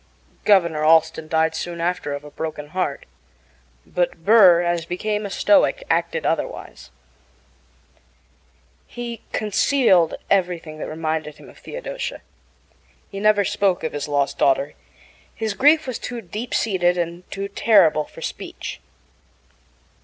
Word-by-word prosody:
Governor 170 -7 +3
Allston 160 0 +3
died 160 0 +1
soon 170 +1 -5
after 170 -4 -2
of 145 +1 -6
a 150 - -12
broken 150 -2 -6
heart; 155 -5 -3 0.8
but 175 -2 -2
Burr, 190 -5 +7
as 175 -1 0
became 210 +5 -3
a - - -9
Stoic, 310 - +3
acted - - 0
otherwise. - - -3 2.0
He 235 -2 -7
concealed 210 - +2
everything 175 -5 -1
that - - -5
reminded 155 -1 -3
him - - -14
of - - -19
Theodosia. - - -6 0.9
He 195 - -6
never 210 -1 +3
spoke 190 -1 0
of 160 - -3
his 145 -1 -4
lost 145 -1 -1
daughter. 140 +1 +2 0.6
His 220 -2 -2
grief 300 +7 +4
was 255 -3 -4
too 245 -1 -5
deep 215 +4 -5
seated 180 -5 +1
and 170 +1 -4
too 195 0 -4
terrible 195 -7 +3
for - - -12
speech. - - -6
180 Hz, 130 wpm, -22 LUFS, 160-215 Hz, 2.0 s, Burr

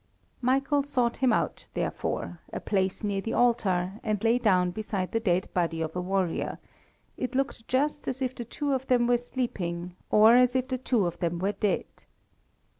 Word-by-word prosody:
Michael 275 +3 +2
sought 250 -4 0
him 260 -2 +3
out, - - -1
therefore, - - -3
a - - -4
place 190 -1 -1
near 200 -2 0
the 225 - -3
altar, 205 -5 +1
and 215 -3 -1
lay 235 +2 +4
down 185 -6 +3
beside 195 -2 -3
the 225 - +1
dead 185 -4 +1
body 170 -2 0
of 160 0 -3
a 180 - -1
warrior, 185 -2 -1 0.6
it 255 0 -3
looked 270 -4 -2
just 290 +3 0
as 260 - -2
if 260 -1 -1
the 240 - -6
two 285 +5 -2
of 265 0 -2
them 245 -2 +3
were 240 0 +3
sleeping, 180 -9 -4
or 220 +2 +7
as 250 0 +5
if 255 0 +1
the 255 -1 -2
two 240 -6 +1
of 170 - -3
them 170 0 -1
were 190 +3 0
dead. 205 0 0
225 Hz, 190 wpm, -28 LUFS, 185-255 Hz, 0.6 s, or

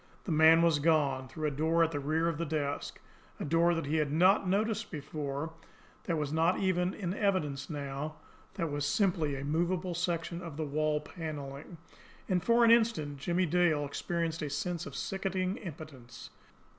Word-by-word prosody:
The 185 - -4
man 160 +1 +6
was 165 -3 +3
gone 140 -4 +2
through 155 +2 -3
a - - -1
door 160 +4 +2
at 165 - +1
the 145 - -2
rear 155 +4 0
of 165 -2 -2
the - - 0
desk, 145 -2 -3 0.4
a - - -3
door 170 +3 +3
that 165 - -2
he 150 +3 0
had 150 -2 0
not 185 +4 +4
noticed 215 +3 0
before, 150 0 -4 0.5
that 170 - 0
was 150 -1 -2
not 165 +3 +3
even 185 -1 +1
in 185 -4 -3
evidence 175 -10 -1
now, 145 0 -4 0.4
that 165 -6 -2
was 145 0 -2
simply 165 -3 +1
a 135 +1 -5
movable 175 +4 0
section 170 0 -2
of 165 -5 -8
the 160 - -2
wall 150 +1 0
panelling 150 0 -7 0.5
and 180 -3 +1
for 235 +3 +5
an 230 - +6
instant 220 -12 +2
Jimmie 175 +5 +1
Dale 165 -3 +2
experienced 165 +3 -2
a 150 - -2
sense 165 +4 -3
of 140 - -9
sickening 190 +2 -2
impotence. 145 - -10
160 Hz, 180 wpm, -31 LUFS, 145-180 Hz, 0.5 s, man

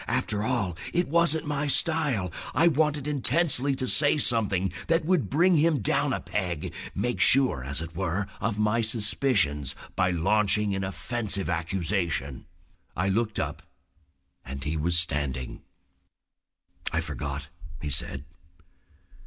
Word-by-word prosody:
After 105 -1 -1
all, 110 -7 -1 0.2
it 175 0 +1
wasn't 165 0 +2
my 145 0 -1
style. 135 - +2 0.2
I 165 +7 +5
wanted 150 -3 +1
intensely 145 -1 +1
to 130 - -3
say 145 +2 +4
something 100 - +2
that 165 -1 +2
would 180 -4 +1
bring 175 +4 +3
him 155 0 +3
down 100 - +1
a - - -1
peg, 90 -6 -3 0.2
make 120 0 -1
sure, 130 - +4
as 70 +3 -3
it 80 0 -9
were, 95 +2 -1
of 105 0 -2
my 105 +2 +1
suspicions 105 - +1 0.2
by 90 - +2
launching 100 +4 +2
an 95 0 -2
offensive 100 -2 -3
accusation. 85 -5 -2 0.5
I 95 +3 +1
looked 110 +2 -1
up - - -3 0.8
and 70 +2 -6
he 75 +3 -2
was 85 +2 +2
standing. 70 -6 -1 1.3
"I - - +1
forgot," 70 0 -5 0.3
he 75 0 -4
said. 65 0 -2
105 Hz, 135 wpm, -27 LUFS, 85-140 Hz, 1.3 s, I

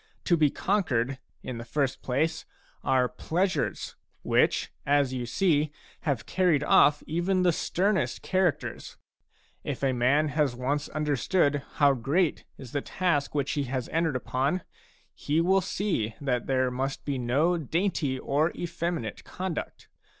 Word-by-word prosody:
To 175 - +3
be 155 -3 +4
conquered, 135 - 0 0.2
in 125 -2 -5
the - - -6
first 135 +2 -1
place, 160 +5 0 0.4
are 130 -1 +3
pleasures, 175 - -1 0.3
which, - - +2
as 140 -2 +2
you 125 -2 -3
see, 155 +1 +2 0.4
have 130 -5 -1
carried 175 -6 +2
ofF 145 0 +5
even 180 +4 0
the 180 - +5
sternest 180 - 0
char 185 -2 +3
acters. - - -8 0.7
If - - -4
a 135 -1 +2
man 140 +5 +3
has 145 -3 +1
once 140 +4 -1
understood 150 0 +1
how 145 -2 +4
great 145 +7 0
is 130 -3 -10
the 145 - -1
task 150 -6 -1
which 140 -2 0
he 145 -2 -1
has 130 -1 -3
entered 160 -3 0
upon, 135 +7 -1 0.5
he 150 +3 -1
will 190 +3 +3
see 175 - -1
that 125 -4 -1
there 130 -1 +1
must 135 +2 -3
be 140 -3 -1
no 140 +9 +2
dainty 160 -3 0
or 150 +5 +1
efFeminate 170 -7 -3
conduct. 185 -3 -5
145 Hz, 145 wpm, -28 LUFS, 130-170 Hz, 0.7 s, ofF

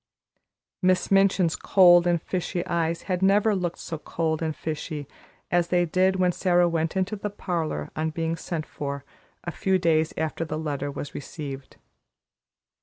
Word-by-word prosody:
Miss 185 0 +2
Minchin's 195 -4 +4
cold 175 -2 +6
and 175 -1 +2
fishy 180 +1 -3
eyes 165 0 -1
had 185 -2 -2
never 205 +3 +4
looked 175 -2 -2
so 160 - -6
cold 160 0 -2
and 160 -2 -2
fishy 155 -2 -5 0.4
as 175 -1 +2
they 175 0 +2
did 185 +3 +2
when 180 -1 +2
Sara 175 -1 +3
went 165 +1 -1
into 190 +3 0
the 210 0 -4
parlor, 165 - -3
on 155 +1 -1
being 165 +1 -2
sent 165 -1 -4
for, 140 -1 -5 0.4
a 175 - -4
few 190 +2 +1
days 160 -3 +2
after 160 +1 -2
the 155 -1 -4
letter 145 -2 -3
was 140 0 -6
received. 140 -2 -7
170 Hz, 160 wpm, -25 LUFS, 155-185 Hz, 0.4 s, cold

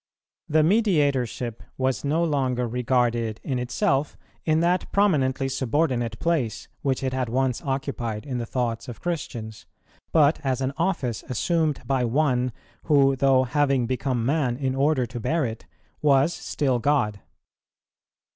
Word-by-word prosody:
The 155 +1 +4
Mediatorship 145 - +1 0.2
was 130 -3 0
no 155 +4 +1
longer 130 -6 0
regarded 120 -2 0
in 130 -3 -2
itself, 135 +3 0 0.3
in 155 0 +3
that 175 +2 +1
prominently 140 -10 +2
subordinate 130 -3 0
place 155 -10 -1
which 135 -1 -1
it 130 -1 -1
had 130 -2 -1
once 130 0 0
occupied 135 -5 -3
in 130 -4 -3
the 115 - -4
thoughts 115 -2 -2
of 120 - -8
Christians, 120 -11 -5 0.4
but 155 -1 +4
as 130 -2 0
an 135 +1 -1
office 165 - -1
assumed 155 +4 0
by 135 -2 +1
One, 125 0 +1 0.3
who 140 -3 +4
though 135 -1 +4
having 135 -1 +1
become 125 -1 -1
man 135 -3 +1
in 135 -1 -1
order 135 -1 +2
to 120 +1 -7
bear 150 +6 0
it, 115 -1 -6 0.3
was 145 +2 +4
still 130 -4 -1
God. 115 -6 +1
130 Hz, 140 wpm, -25 LUFS, 125-150 Hz, 0.4 s, The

